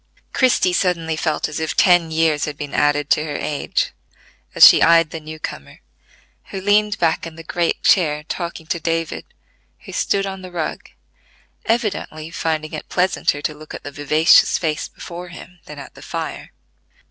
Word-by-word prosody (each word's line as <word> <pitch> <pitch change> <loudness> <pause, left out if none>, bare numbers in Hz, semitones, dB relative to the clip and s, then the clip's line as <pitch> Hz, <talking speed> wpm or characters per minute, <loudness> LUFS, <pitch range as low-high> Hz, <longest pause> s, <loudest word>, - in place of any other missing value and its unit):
Christie 250 -8 +3
suddenly 170 -4 0
felt 155 -1 -1
as 155 - -5
if 160 -1 -3
ten 175 -3 +4
years 160 -2 +1
had 150 -2 -6
been 145 -1 -7
added 145 0 +1
to 150 - +3
her 150 -2 -5
age, 145 0 -2 0.6
as - - +11
she - - +6
eyed 165 -1 +5
the 165 - -5
new 155 0 -9
comer, 70 - -8 0.7
who 195 - -6
leaned 205 +1 +2
back 165 0 0
in 165 - -11
the 165 - -10
great 170 +1 -1
chair 150 -7 +3
talking 170 0 -5
to 170 +2 -2
David, 165 0 -2 0.6
who - - -11
stood 195 0 0
on 190 -1 -6
the 185 - -9
rug, 170 -3 -4 0.8
evidently 200 -8 -2
finding 155 -2 -3
it 155 - -7
pleasanter 180 -5 0
to 155 - -1
look 155 +1 -11
at - - -9
the 145 - -7
vivacious 150 +3 +4
face 155 -3 -2
before 175 +1 -9
him 180 +1 -12
than 150 - -10
at 140 - -10
the - - -15
fire. - - -6
160 Hz, 175 wpm, -20 LUFS, 150-180 Hz, 0.8 s, as